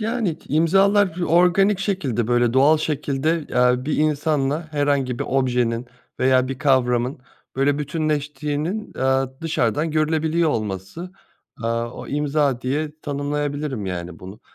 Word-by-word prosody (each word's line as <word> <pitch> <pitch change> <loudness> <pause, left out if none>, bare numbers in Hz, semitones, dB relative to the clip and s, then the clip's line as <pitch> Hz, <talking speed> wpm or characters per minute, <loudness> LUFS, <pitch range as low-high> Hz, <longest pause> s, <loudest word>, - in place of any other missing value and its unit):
Yani 220 -7 -1
k - - -23
imzalar 190 +4 +3
organik 180 +4 +4
şekilde, 145 - -1
böyle 120 -1 +2
doğal 140 +5 +5
şekilde, 150 +1 -1
eee, 125 +1 +2
bir 155 - -1
insanla 150 0 0
herhangi 140 -4 0
bir - - -2
objenin 125 -2 0 0.3
veya 130 0 +3
bir 135 -1 -5
kavramın 130 -2 +1 0.4
böyle 140 +1 +2
bütünleştiğinin, 150 +5 -2
eee, 130 0 +2 0.2
dışarıdan 155 -1 0
görülebiliyor 160 +1 +1
olması. 110 - -4 0.5
Eee, 115 - -1
o 115 +1 -3
imza 145 -3 0
diye 150 +4 -2
tanımlayabilirim 145 -4 -3
yani 90 -2 -5
bunu. 95 +4 -11
145 Hz, 125 wpm, -22 LUFS, 125-160 Hz, 0.5 s, doğal